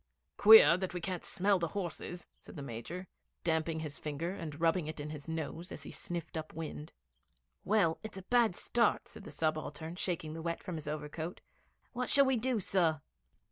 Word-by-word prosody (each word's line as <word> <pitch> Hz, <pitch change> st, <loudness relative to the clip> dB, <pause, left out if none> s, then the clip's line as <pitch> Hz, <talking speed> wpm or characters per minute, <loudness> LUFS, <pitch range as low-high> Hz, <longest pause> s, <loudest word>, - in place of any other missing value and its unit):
'Queer 205 Hz, -7 st, +9 dB
that 185 Hz, -1 st, -3 dB
we -, -, -1 dB
can't 180 Hz, 0 st, -4 dB
smell 195 Hz, 0 st, +2 dB
the 170 Hz, -, 0 dB
horses,' 175 Hz, -1 st, -4 dB
said -, -, -13 dB
the 145 Hz, -, -6 dB
Major, 140 Hz, +10 st, -6 dB, 0.4 s
damping 160 Hz, -1 st, 0 dB
his 150 Hz, -2 st, -5 dB
finger 155 Hz, +3 st, -3 dB
and 160 Hz, -6 st, -6 dB
rubbing 165 Hz, 0 st, +2 dB
it 155 Hz, 0 st, -5 dB
on 150 Hz, +1 st, -5 dB
his 150 Hz, -1 st, -8 dB
nose 160 Hz, +2 st, -4 dB
as 140 Hz, -, -6 dB
he -, -, -8 dB
sniffed 170 Hz, -2 st, -5 dB
up 155 Hz, -1 st, -5 dB
wind. 155 Hz, -1 st, -6 dB, 0.7 s
'Well, 190 Hz, -6 st, +3 dB
it's 220 Hz, -3 st, -7 dB
a 190 Hz, -, -7 dB
bad 235 Hz, -2 st, +3 dB
start,' 235 Hz, +2 st, +2 dB
said 205 Hz, -, -10 dB
the -, -, -7 dB
subaltern, 155 Hz, +1 st, -2 dB
shaking 165 Hz, -5 st, -2 dB
the 165 Hz, -, -6 dB
wet 170 Hz, 0 st, -3 dB
from 180 Hz, -4 st, -4 dB
his 150 Hz, -, -7 dB
overcoat. 155 Hz, +3 st, -4 dB, 0.5 s
'What 250 Hz, 0 st, -2 dB
shall 280 Hz, -1 st, +6 dB
we 265 Hz, -1 st, +3 dB
do, 245 Hz, 0 st, +1 dB
sir?' 170 Hz, -5 st, +2 dB
165 Hz, 190 wpm, -33 LUFS, 155-190 Hz, 0.7 s, Queer